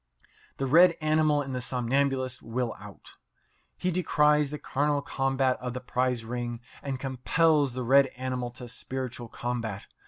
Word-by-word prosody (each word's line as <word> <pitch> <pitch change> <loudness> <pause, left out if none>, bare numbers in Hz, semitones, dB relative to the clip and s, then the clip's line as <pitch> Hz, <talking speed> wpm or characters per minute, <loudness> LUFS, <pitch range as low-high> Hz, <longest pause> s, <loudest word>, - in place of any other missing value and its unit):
The 135 - -1
red 170 +5 +6
animal 155 -1 +2
in 135 - -7
the 125 -1 -3
somnambulist 130 +1 0
will 115 +1 -3
out. - - -13 0.6
He 185 - 0
decries 150 -4 +3
the 150 - -5
carnal 145 0 0
combat 135 -1 0
of 125 0 -5
the - - -2
prize 125 -2 -1
ring, 120 0 -4 0.2
and 135 -2 -4
compels 140 +2 +2
the 130 0 -3
red 135 +3 +5
animal 130 -1 -3
to 125 -1 -8
spiritual 125 0 -5
combat. 115 -4 -4
130 Hz, 150 wpm, -28 LUFS, 125-145 Hz, 0.6 s, red